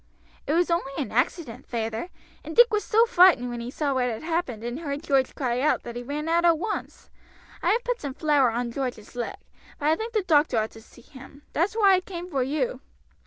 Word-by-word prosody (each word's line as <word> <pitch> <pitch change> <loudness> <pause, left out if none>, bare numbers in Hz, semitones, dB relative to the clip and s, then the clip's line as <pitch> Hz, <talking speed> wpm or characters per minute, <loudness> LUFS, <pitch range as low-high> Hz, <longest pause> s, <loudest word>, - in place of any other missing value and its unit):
"It 295 - +1
was 345 +1 +2
only 305 -5 -1
an 280 -8 -3
accident, 250 +1 -1
feyther, 225 +5 -3 0.3
and 320 +1 -7
Dick 480 -1 +6
was 420 - +1
so 450 +2 +4
frightened 355 - +5
when 240 - -5
he 235 +1 -5
saw 280 +1 -1
what 250 -1 +1
had 225 +3 -5
happened 320 -9 -2
and 240 +4 -4
heard 290 -2 -4
George 270 -4 +1
cry 250 -3 -1
out 300 - +1
that 235 - -8
he 240 - -4
ran 290 +5 -4
out 335 +1 +2
at 340 -2 +5
once. 420 +6 -5 0.5
I - - +1
have 475 +2 +2
put - - -2
some 275 -3 -5
flour 295 -5 +3
on 235 +1 -2
George's 245 -4 -5
leg; 240 -1 -4 0.4
but 295 0 0
I 315 - +4
think 450 +5 -5
the 430 -3 +1
doctor 300 -7 +3
ought 220 0 0
to 225 - -13
see 225 - -18
him, 275 +2 -14
that's 360 +7 0
why 405 -4 +5
I 370 - +3
came 360 -1 -8
for 270 - 0
you." 305 - -1
295 Hz, 230 wpm, -25 LUFS, 245-345 Hz, 0.5 s, Dick